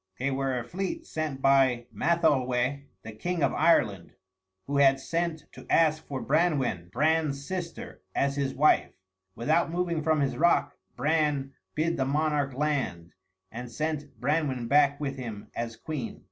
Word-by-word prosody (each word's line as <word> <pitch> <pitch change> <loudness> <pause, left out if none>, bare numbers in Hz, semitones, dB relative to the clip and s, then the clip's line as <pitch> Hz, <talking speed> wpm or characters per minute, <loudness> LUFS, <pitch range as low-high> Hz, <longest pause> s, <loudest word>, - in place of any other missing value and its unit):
They 135 +2 -1
were 135 -1 -1
a 120 - -3
fleet 195 - -4
sent 155 - -4
by 130 -3 +4
Matholweh, 140 -5 +1 0.2
the 115 - -7
king 170 +9 -2
of - - +2
Ireland, 100 - +2 0.5
who 140 0 -1
had 135 -1 +5
sent 165 +1 -2
to - - -13
ask 155 -1 +3
for 135 -2 -4
Branwen, 135 - +1
Bran's 150 0 +1
sister, 180 -1 -6
as 140 0 +1
his 140 -2 -1
wife. 150 +3 +3 0.4
Without 155 +8 +1
moving 170 -1 -1
from 155 -1 +2
his 140 - 0
rock 170 +2 +3 0.2
Bran 145 -1 0 0.2
bid 165 +2 0
the 135 - +1
monarch 145 -1 0
land, 135 - -2 0.4
and 120 +1 -7
sent 150 +1 -4
Branwen 135 -3 0
back 140 +1 +4
with 140 -2 -3
him 115 -5 -7
as 115 0 -3
queen. 145 -5 -5
140 Hz, 150 wpm, -28 LUFS, 130-160 Hz, 0.5 s, had